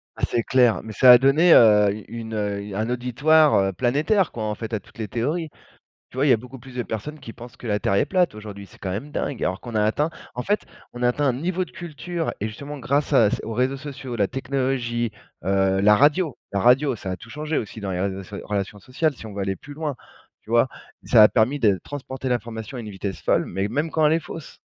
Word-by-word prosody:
Ah, - - -11
c'est 115 - 0
clair, 125 -3 +3
mais 110 - -8
ça 125 +5 +7
a 125 - +11
donné, 140 +7 +5
heu, 105 -3 +6 0.2
une, 115 -1 -6
heu, 100 -1 -3
un 110 +3 -1
auditoire, 135 +6 +3
heu, 95 -1 +2
planétaire, 150 - +1
quoi, 115 - -5
en 105 -1 -2
fait, 110 +1 -7
à 110 - 0
toutes 100 - -21
les 110 -2 -4
théories. 150 - -2 0.6
Tu - - -14
vois? 135 +3 +2
Il - - +4
y - - +8
a - - +5
beaucoup 125 +3 -11
plus 130 +1 -13
de 125 - -1
personnes 130 +9 -6
qui 115 - -9
pensent 120 0 -12
que - - -10
la 105 -2 +1
Terre 100 - 0
est 100 - +2
plate, 180 - +1
aujourd'hui. 105 -2 -9
C'est - - -19
quand 95 - -4
même 115 +11 -5
dingue, 135 - -2
alors 95 +2 -2
qu'on 120 -2 -8
a 105 - +3
atteint 150 +9 +1 0.2
en 125 - -3
fait, 205 +7 0 0.3
on 120 - -7
a 120 - +5
atteint 145 +4 0
un 130 - +3
niveau 180 +6 -1
de - - -17
culture 170 +1 -5
et 110 - -1
justement, 140 +7 -8
grâce 140 +3 0
à 115 -6 +5
c - - -1
aux 115 - -5
réseaux 130 +4 0
sociaux, 135 -3 -7
la 100 -3 +2
technologie, 125 -3 -2 0.3
heu, 95 0 +2
la 105 +1 +6
radio 150 - +3 0.2
la 100 - 0
radio, 130 +2 +4
ça 95 - -6
a - - -3
tout 115 - -14
changé 150 +2 -2
aussi 110 +1 -6
dans 100 -2 -3
les 90 - -2
réseaux 95 0 -2
so 100 - -9
relations 100 0 -3
sociales, 140 - -1
si 115 - -11
on 105 - -9
veut 100 - -3
aller 95 0 -1
plus 145 +7 -12
loin, 150 -2 -3 0.5
tu 110 - -15
vois? 120 +2 +4 0.4
Ça 115 -3 +6
a 105 - +9
permis 125 +5 +1
de 100 -4 +3
transporter 130 -2 -6
l'information 115 0 -4
à - - -4
une 110 -2 -7
vitesse 95 0 -5
folle - - +2
mais 95 +3 -2
même 145 +8 -1
quand 160 0 +1
elle 150 - +5
est - - +2
fausse, 155 -1 -10
120 Hz, 255 wpm, -23 LUFS, 105-145 Hz, 0.6 s, a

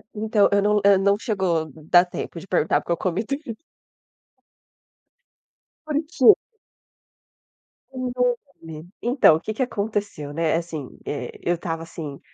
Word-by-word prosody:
Então, 215 -1 +2
eu 200 0 +3
não 210 +1 +2
eu 200 -1 +6
não 200 +1 +3
chegou 180 -8 -1
dar 160 +5 +3
tempo 175 -1 -6
de 165 - -12
perguntar 175 -4 +1
porque - - -6
eu 170 - +1
comi 185 +5 -1
tudinho. 275 -1 -5 2.3
Porque 310 +7 +4 1.6
Pois 255 -1 -4 0.5
é, - - -15
menina. 160 +1 -9
Então, 240 - +5
o - - -2
que 215 - -4
que 240 - 0
aconteceu, 205 - -3
né, 160 0 +1
assim, 165 -5 -4 0.2
eh, 135 -4 -4
eu 175 - +1
estava 165 -1 -4
assim, 155 -4 -8
185 Hz, 140 wpm, -23 LUFS, 165-215 Hz, 2.3 s, eu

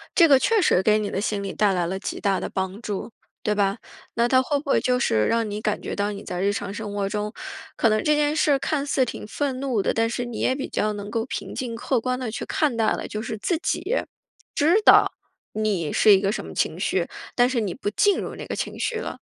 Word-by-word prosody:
这 335 - +7
个 275 -3 +6
确 445 +7 +3
实 185 - +4
给 215 0 +4
你 205 - -2
的 195 - -2
心 205 -1 -1
理 195 - -4
带 205 -2 +2
来 175 -2 0
了 190 +3 -3
极 - - -5
大 195 -1 +1
的 - - -4
帮 190 +3 -3
助， 210 0 -4 0.3
对 210 - +1
吧？ 200 +1 +1 0.4
那 235 +1 +3
它 255 +1 +4
会 285 +2 0
不 285 - -9
会 - - +4
就 250 0 +1
是 110 - +2
让 230 -2 +1
你 210 +1 -4
感 210 -1 -1
觉 - - -4
到 205 +1 -1
你 200 0 -7
在 180 0 -4
日 200 +1 +2
常 205 -1 -4
生 210 -1 -5
活 200 -1 -1
中， 210 +1 -3 0.4
可 230 - +3
能 215 0 +1
这 300 - +3
件 295 0 +1
事 290 -3 +3
看 285 -1 -1
似 265 -2 +2
挺 - - -6
愤 260 +3 -2
怒 260 -6 0
的， - - 0
但 225 0 +1
是 245 +1 -3
你 240 -2 -6
也 260 - +1
比 270 - -4
较 215 0 0
能 205 0 -6
够 230 -1 -1
平 - - -5
静 240 -3 -4
客 245 +1 0
观 255 +2 -2
地 250 -4 -3
去 230 - -5
看 305 -10 0
待 225 -1 +2
了， - - -2
就 215 - -4
是 220 -2 -4
自 335 - 0
己 345 - -1
知 405 +8 -1
道 - - -2 1.5
你 205 -8 -1
是 210 - +6
一 190 - +1
个 195 - +1
什 - - -4
么 - - -9
情 - - -1
绪， - - 0 0.3
但 245 +1 +4
是 255 -3 0
你 195 -4 -2
不 245 - -3
进 405 - +2
入 - - -5
那 - - -7
个 - - -4
情 - - -4
绪 - - -1
了？ - - -5
220 Hz, 285 characters per minute, -24 LUFS, 205-260 Hz, 1.5 s, 这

